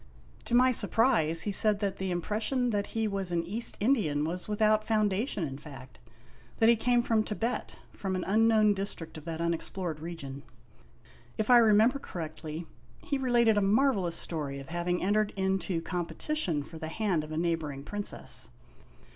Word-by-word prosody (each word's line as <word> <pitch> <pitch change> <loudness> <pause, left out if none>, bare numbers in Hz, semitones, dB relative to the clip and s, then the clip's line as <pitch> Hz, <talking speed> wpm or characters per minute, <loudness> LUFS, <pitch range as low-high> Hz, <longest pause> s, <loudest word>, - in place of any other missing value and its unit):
To 235 - 0
my 255 +1 +6
surprise, 205 -8 +3
he 205 - -1
said 210 +1 +3
that 200 -2 -2
the 190 0 -3
impression 220 +8 -1
that 205 -1 -1
he 220 -1 +1
was 195 -3 -2
an 170 -1 0
East 215 +7 -1
Indian 200 - +1
was 180 +3 -4
without 215 0 +2
foundation 215 - 0
in 135 0 -7
fact; 135 -4 -12 0.6
that 225 - +4
he 235 - +6
came 240 +1 +2
from 225 -2 +2
Tibet, 225 +3 -3 0.2
from 190 -2 -3
an 185 - -2
unknown 215 0 +4
district 195 -5 -4
of 155 -1 -10
that 165 -1 -4
unexplored 170 0 -3
region. 145 -4 -7 1.0
If 215 +3 +1
I 245 - +9
remember 225 +4 +4
correctly, 160 - -6 0.4
he 280 - -2
related 235 -4 +3
a - - 0
marvelous 200 -4 +2
story 145 -4 -3
of 135 - -10
having 175 +1 -1
entered 210 +2 +1
into 190 -3 -1
competition 175 - -2
for 160 +3 -11
the 160 - -5
hand 180 -2 -1
of 155 - -9
a 155 - -3
neighboring 160 -5 -2
princess. 205 +6 -4
195 Hz, 165 wpm, -29 LUFS, 165-220 Hz, 1.0 s, I